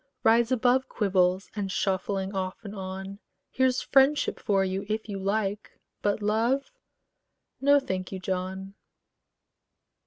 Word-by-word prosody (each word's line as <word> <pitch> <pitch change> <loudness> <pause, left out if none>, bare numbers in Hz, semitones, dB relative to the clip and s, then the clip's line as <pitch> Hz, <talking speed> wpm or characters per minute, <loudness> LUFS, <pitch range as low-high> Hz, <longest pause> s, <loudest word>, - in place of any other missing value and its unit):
Rise 230 +2 +4
above 255 +1 +2
Quibbles 190 -2 +1
and 200 -2 -2
shuffling 195 0 -1
off 185 -1 -3
and 200 - -6
on: 190 0 -6 0.3
Here's 260 -1 +2
friendship 275 +2 +3
for 195 -2 +1
you 190 +1 -2
if 215 +1 -2
you 200 -2 -4
like; 200 +1 -2 0.2
but 205 +1 0
love, 230 +6 +1 0.9
No, 285 +1 +6
thank 185 -8 -4
you, 190 - -4
John. 190 +1 -4
200 Hz, 125 wpm, -27 LUFS, 190-230 Hz, 0.9 s, No